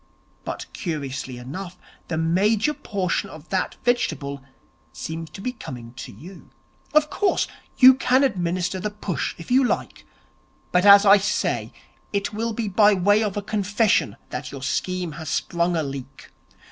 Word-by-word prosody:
But, - - -5
curiously 135 - -4
enough, 175 +9 -7 0.3
the 160 - -2
major 200 - +2
portion 195 -10 -2
of 155 +1 -12
that 190 -1 -1
vegetable 140 - 0 0.5
seems 160 0 -6
to - - -10
be 250 - -2
coming 120 - -9
to 130 - -7
you. 180 +4 -13 0.4
Of 305 0 +3
course, 405 -2 +1 0.3
you 260 0 +10
can 260 +1 +2
administer 180 -5 0
the 210 - -2
push 205 -7 -3
if 170 - -10
you 260 +2 +5
like; 245 - -2 0.7
but, 180 +3 +3
as 200 +1 +9
I 200 +1 +8
say, 205 +2 -1 0.4
it 200 +2 -2
will 225 +2 -2
be 220 0 -2
by 205 +1 +5
way 205 +3 +3
of 210 -2 -1
a 205 - -2
confession 205 +1 +1
that - - -5
your 135 -2 -8
scheme 180 +6 -2
has 160 - -5
sprung 170 +2 0
a 160 - 0
leak. 135 -2 -8
190 Hz, 160 wpm, -23 LUFS, 160-210 Hz, 0.7 s, you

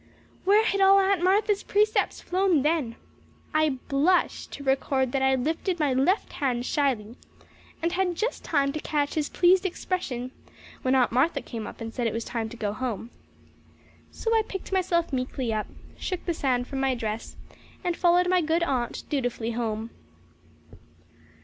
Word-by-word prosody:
Where 415 +3 +5
had 395 -2 +1
all 390 0 +7
Aunt 390 -2 +2
Martha's 405 +2 +3
precepts 425 +1 +1
flown 370 0 +1
to 290 - +3
then? 295 -7 0 0.6
I 310 -3 +2
blush 325 +6 +2
to 280 - -9
record 265 -1 +1
that 270 - 0
I 265 0 +4
lifted 325 +7 -1
my 290 -4 +2
left 285 +11 +1
hand 250 -3 -1
shyly 250 -7 -1 0.7
and 335 - +1
had 360 -1 0
just 445 +7 -2
time 280 -3 +1
to 310 - -3
catch 295 -2 -1
his 300 -2 -1
pleased 365 +1 +4
expression 320 -9 -3 0.5
when 260 +1 +2
Aunt 255 -2 +3
Martha 265 +8 +2
came 225 -4 -6
up - - -10
and 225 0 -5
said 240 -2 -1
it 225 - -2
was 230 - -3
time 225 -2 -3
to 235 - -10
go 210 -3 -2
home. 235 -1 -4 1.0
So 455 - -2
I 445 - +5
picked 390 -3 -7
myself 350 -4 +1
meekly 255 -2 -2
up, 215 -1 -2 0.3
shook 370 -2 -4
the 345 - 0
sand 255 -5 0
from 270 - -4
my 265 -1 +1
dress, 220 -1 -4 0.5
and 350 -2 0
followed 355 0 +3
my 365 0 +3
good 325 +2 +1
aunt 255 -7 -1
dutifully 245 -5 -2
home. 225 -1 -3
285 Hz, 170 wpm, -26 LUFS, 245-360 Hz, 1.0 s, all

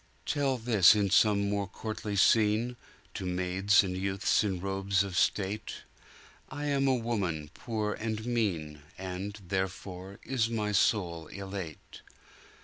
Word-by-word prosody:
"Tell 140 -3 0
this 110 -5 +6
in 100 -2 +1
some 100 -1 +4
more 100 -1 -1
courtly 105 +1 -5
scene, 110 +4 +3 0.4
To - - -5
maids 90 +3 +2
and 90 -1 -3
youths 95 +2 +1
in 95 -4 -1
robes 95 +1 0
of 95 -2 -6
state!I 105 +9 -4
am 140 -1 +1
a 130 - +4
woman 95 -11 -2
poor 105 -2 -3
and 110 0 -4
mean, 85 -11 -1 0.2
And, 95 +3 -5
therefore, 95 0 -4
is 120 -4 0
my 105 -2 -1
soul 90 -5 +1
elate. 95 -5 -8
100 Hz, 130 wpm, -30 LUFS, 95-110 Hz, 0.4 s, this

